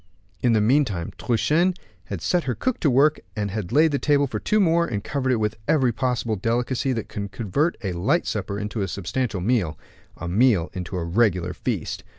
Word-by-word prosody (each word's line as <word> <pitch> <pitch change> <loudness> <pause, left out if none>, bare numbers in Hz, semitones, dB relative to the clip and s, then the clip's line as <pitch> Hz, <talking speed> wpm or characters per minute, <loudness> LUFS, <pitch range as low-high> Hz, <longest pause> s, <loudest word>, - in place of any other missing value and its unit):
In 120 -2 +3
the 110 - +3
meantime 110 - +1
Truchen 160 +10 +2 0.3
had 100 -5 -5
set 180 -2 +1
her 125 - -1
cook 255 -2 -1
to 150 - +2
work, 140 +4 +4 0.2
had 105 -2 -3
laid 155 +2 +4
the 140 - 0
table 145 -1 +3
for 135 - -4
two 215 - +1
more, 170 -3 +3
and 100 -7 -3
covered 130 -3 -1
it - - +3
with 105 0 -1
every 130 -6 +3
possible 120 -2 -1
delicacy 120 +6 0
that 115 -3 -4
could 100 -1 -5
convert 120 - 0
a 95 - -1
light 85 0 +1
supper 100 - -3
into 105 +1 -3
a 95 - 0
substantial 100 +3 -2
meal, 95 -7 0 0.4
a 90 - -6
meal 100 -2 +3
into 90 0 -5
a 85 - -2
regular 90 -1 +1
feast. - - -3
115 Hz, 195 wpm, -24 LUFS, 100-140 Hz, 0.4 s, work